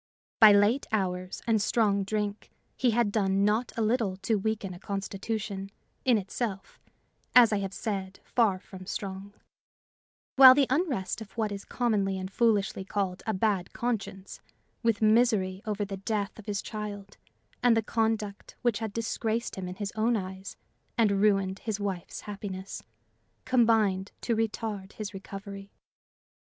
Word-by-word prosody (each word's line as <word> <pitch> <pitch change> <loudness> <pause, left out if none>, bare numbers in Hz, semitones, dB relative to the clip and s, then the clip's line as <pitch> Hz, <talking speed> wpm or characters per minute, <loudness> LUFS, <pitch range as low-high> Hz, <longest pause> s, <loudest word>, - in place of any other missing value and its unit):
By 215 -2 +10
late 205 +6 +4
hours 185 -3 -2
and 225 -2 +2
strong 205 -3 +2
drink, 205 +1 -3 0.3
he 250 - +2
had 230 -2 +2
done 195 -2 +2
not 220 +4 +1
a 225 - +1
little 215 -4 +1
to 220 - +1
weaken 210 -2 -2
a 175 - -10
constitution, 195 +1 -4 0.4
in 250 -3 +5
itself, 200 0 -4 0.6
as 235 -3 +8
I 205 - +1
have 195 -1 -3
said, 195 -2 -4
far 220 -6 +2
from 185 0 -12
strong; 195 0 -5 1.1
while 260 -1 +11
the 280 -1 +4
unrest 260 - 0
of 210 -3 -10
what 220 -2 -1
is 200 -1 -5
commonly 205 -6 0
and 190 0 -5
foolishly 205 -4 +1
called 190 -2 -2
a 220 - +1
bad 190 -3 0
conscience, 200 -5 -4 0.4
with 230 -2 +1
misery 215 -4 +3
over 210 -1 -1
the 195 -1 -5
death 200 +1 -3
of 210 - -12
his 205 -1 -2
child 210 -2 -6 0.4
and 245 -2 +5
the 225 - +1
conduct 220 -2 -2
which 235 -4 +2
had 220 -3 -4
disgraced 230 +1 -2
him 190 -1 -5
in 180 - -6
his 200 0 -4
own 225 +2 +2
eyes 190 0 -7 0.4
and 200 -4 +3
ruined 195 -2 +2
his 215 -3 -3
wife's 195 -4 -4
happiness, 195 -2 -6 0.6
combined 225 -6 +3
to 235 - 0
retard 215 -3 -3
his 210 -2 -6
recovery. 195 +1 -8
205 Hz, 150 wpm, -28 LUFS, 195-225 Hz, 1.1 s, while